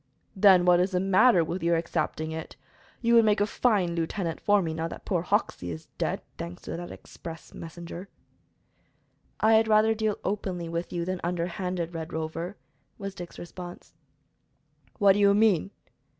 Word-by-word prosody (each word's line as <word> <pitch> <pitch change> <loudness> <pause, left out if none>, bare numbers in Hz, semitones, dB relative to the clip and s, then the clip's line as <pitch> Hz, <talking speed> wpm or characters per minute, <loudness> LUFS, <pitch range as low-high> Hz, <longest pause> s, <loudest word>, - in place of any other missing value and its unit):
"Then 190 -2 +6
what 175 -1 +6
is 185 +2 +1
the 180 - +2
matter 190 +1 +5
with 170 +3 -4
your 170 +1 +2
accepting 160 -1 -2
it? 160 0 -6 0.5
You 235 0 +3
would 230 -1 +7
make 210 -1 +3
a 205 - +3
fine 205 -5 +1
lieutenant 170 0 -2
for 205 0 +4
me, 165 -4 -2
now 165 +1 -2
that - - -9
poor 180 -4 0
Hoxey 180 - -1
is 80 -2 -7
dead - - -1 0.2
thanks 85 +1 -7
to - - -5
that 175 +1 -6
express 165 -1 -10
messenger." 170 +3 -8 1.3
"I 220 +1 +5
had 220 0 +5
rather 215 +1 +4
deal 215 -1 -1
openly 185 -4 -2
with 170 +1 -4
you 170 -1 -2
then 185 0 -3
underhanded, 175 0 -2
Red 160 0 -6
Rover," 165 +4 -4 0.4
was 195 -1 -5
Dick's 175 -2 -9
response. 175 0 -9 1.0
"What 200 -3 +6
do 205 - 0
you 200 0 +5
mean?" 205 -4 +3
180 Hz, 170 wpm, -27 LUFS, 170-200 Hz, 1.3 s, would